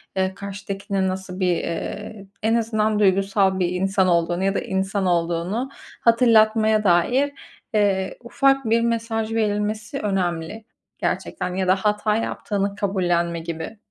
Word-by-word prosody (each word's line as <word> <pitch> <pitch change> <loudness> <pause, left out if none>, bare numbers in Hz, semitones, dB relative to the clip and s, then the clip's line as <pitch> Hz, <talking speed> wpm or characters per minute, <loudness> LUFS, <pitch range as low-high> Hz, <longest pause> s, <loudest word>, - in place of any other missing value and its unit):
eee, 190 0 0
karşıdakinin 200 0 -3
nasıl 185 0 -5
bir, 180 -2 +2
eee, 200 +4 -5 0.2
en 225 +1 +3
azından 220 -2 +1
duygusal 195 -1 +2
bir 175 -1 +1
insan 190 +1 +1
olduğunu 175 +1 +1
ya 195 +1 +1
da - - +2
insan 190 +1 -1
olduğunu 175 +8 0 0.3
hatırlatmaya 220 -2 +4
dair, 240 +11 +3 0.4
eee, 195 -3 +1
ufak 270 +2 +2
bir 230 +1 +3
mesaj 230 -1 -1
verilmesi 210 +3 -1
önemli 185 +1 -2 0.3
gerçekten 180 - -2
ya 190 -1 -1
da 185 - +5
hata 210 +1 0
yaptığını 200 -2 -2
kabullenme 175 -4 0
gibi. 165 +5 -6
200 Hz, 130 wpm, -22 LUFS, 185-220 Hz, 0.4 s, da